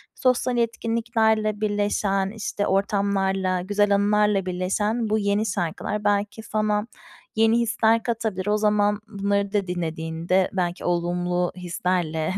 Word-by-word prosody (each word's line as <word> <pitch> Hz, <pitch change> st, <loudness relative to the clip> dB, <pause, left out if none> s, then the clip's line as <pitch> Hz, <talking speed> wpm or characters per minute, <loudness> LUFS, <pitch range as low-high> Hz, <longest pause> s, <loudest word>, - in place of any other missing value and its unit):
sosyal 255 Hz, -1 st, +1 dB
etkinliklerle 225 Hz, -2 st, 0 dB
birleşen, 205 Hz, -2 st, 0 dB
işte, 205 Hz, -1 st, -3 dB
ortamlarla, 195 Hz, -1 st, 0 dB
güzel 205 Hz, +2 st, +2 dB
anılarla 205 Hz, -1 st, +2 dB
birleşen 205 Hz, +5 st, -1 dB
bu 215 Hz, -, +2 dB
yeni 200 Hz, +1 st, +1 dB
şarkılar 195 Hz, +2 st, -2 dB
belki 205 Hz, +2 st, 0 dB
sana 215 Hz, 0 st, -1 dB, 0.5 s
yeni 225 Hz, +1 st, +4 dB
hisler 225 Hz, -1 st, +2 dB
katabilir. 220 Hz, -5 st, -2 dB
O 210 Hz, 0 st, +2 dB
zaman 210 Hz, -1 st, +2 dB
bunları 200 Hz, -1 st, -1 dB
da 200 Hz, -3 st, 0 dB
dinlediğinde 170 Hz, +1 st, -1 dB
belki 175 Hz, -2 st, -2 dB
olumlu 175 Hz, 0 st, 0 dB
hislerle 175 Hz, -2 st, -1 dB
205 Hz, 115 wpm, -24 LUFS, 185-215 Hz, 0.5 s, yeni